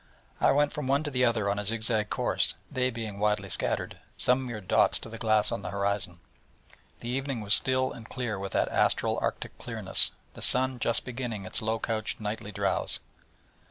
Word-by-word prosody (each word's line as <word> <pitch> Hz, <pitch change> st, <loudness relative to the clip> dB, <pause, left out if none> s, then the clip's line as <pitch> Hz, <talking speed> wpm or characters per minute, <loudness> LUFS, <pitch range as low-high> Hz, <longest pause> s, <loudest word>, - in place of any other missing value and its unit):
I -, -, +5 dB
went 145 Hz, +1 st, +2 dB
from 150 Hz, -3 st, -4 dB
one 140 Hz, +3 st, +2 dB
to 145 Hz, -, -3 dB
the 125 Hz, -1 st, +1 dB
other 115 Hz, -4 st, +2 dB
on 100 Hz, +1 st, 0 dB
a -, -, -2 dB
zig 110 Hz, +2 st, -1 dB
zag 110 Hz, -2 st, +2 dB
course, -, -, +1 dB, 0.2 s
they 130 Hz, 0 st, +1 dB
being 110 Hz, -4 st, -6 dB
widely 105 Hz, -1 st, +1 dB
scattered, -, -, -2 dB, 0.2 s
some 130 Hz, +1 st, +2 dB
mere 115 Hz, -3 st, -5 dB
dots 95 Hz, -, +3 dB
to -, -, -7 dB
the 115 Hz, 0 st, -8 dB
glass 110 Hz, -2 st, +3 dB
on 115 Hz, -, -2 dB
the -, -, -5 dB
horizon. 100 Hz, -3 st, -2 dB, 0.8 s
The 120 Hz, -, -5 dB
evening 135 Hz, -1 st, -2 dB
was 105 Hz, 0 st, +4 dB
still 130 Hz, +2 st, +3 dB
and 115 Hz, -1 st, -10 dB
clear 120 Hz, -6 st, -3 dB
with 95 Hz, 0 st, -5 dB
that -, -, +2 dB
astral -, -, +2 dB
Arctic -, -, -3 dB
clearness, -, -, 0 dB, 0.2 s
the -, -, -10 dB
sun 130 Hz, 0 st, +4 dB
just 115 Hz, 0 st, +1 dB
beginning 120 Hz, -5 st, -4 dB
his 95 Hz, -, -1 dB
low 110 Hz, +1 st, 0 dB
couched 110 Hz, -1 st, -2 dB
nightly 105 Hz, -1 st, -4 dB
drowse. 100 Hz, -1 st, 0 dB
115 Hz, 195 wpm, -28 LUFS, 105-125 Hz, 0.8 s, I